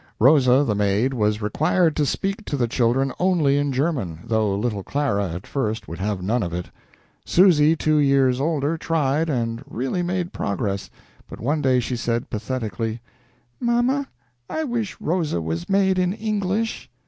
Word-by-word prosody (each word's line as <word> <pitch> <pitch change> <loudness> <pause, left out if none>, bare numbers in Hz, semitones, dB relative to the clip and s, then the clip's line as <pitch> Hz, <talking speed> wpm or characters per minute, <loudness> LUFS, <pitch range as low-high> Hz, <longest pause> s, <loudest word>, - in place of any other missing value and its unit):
Rosa, 130 +1 +5
the 115 - 0
maid, 105 +5 +1
was 105 -2 0
required 155 - +2
to 150 -2 +2
speak 195 - -2
to 145 - -2
the 120 -3 +1
children 125 +3 +1
only 165 -7 +3
in 145 -1 0
German, 130 - -1
though 110 -3 +1
little 105 -2 -2
Clara 100 -6 -1
at 90 +3 -6
first 110 -5 -2
would 85 - -7
have 100 -1 -2
none 115 +6 +1
of 85 -4 -3
it. 90 0 -5 0.5
Susy, 165 -4 +5
two 155 -1 +1
years 135 -2 +3
older, 155 +1 0
tried, 155 0 0
and 115 -3 -2
really 135 - -2
made 180 0 -2
progress, 100 -1 -2 0.4
but - - -9
one 145 +6 0
day 130 -2 +3
she 125 +1 -2
said, 115 0 -2
pathetically: 115 -1 -3 0.6
"Mama, 245 +3 +1 0.4
I 315 - -2
wish 235 - -3
Rosa 160 - -1
was 80 0 -4
made 190 -1 +3
in 180 0 +1
English." 215 0 -2
135 Hz, 160 wpm, -23 LUFS, 110-165 Hz, 0.6 s, Rosa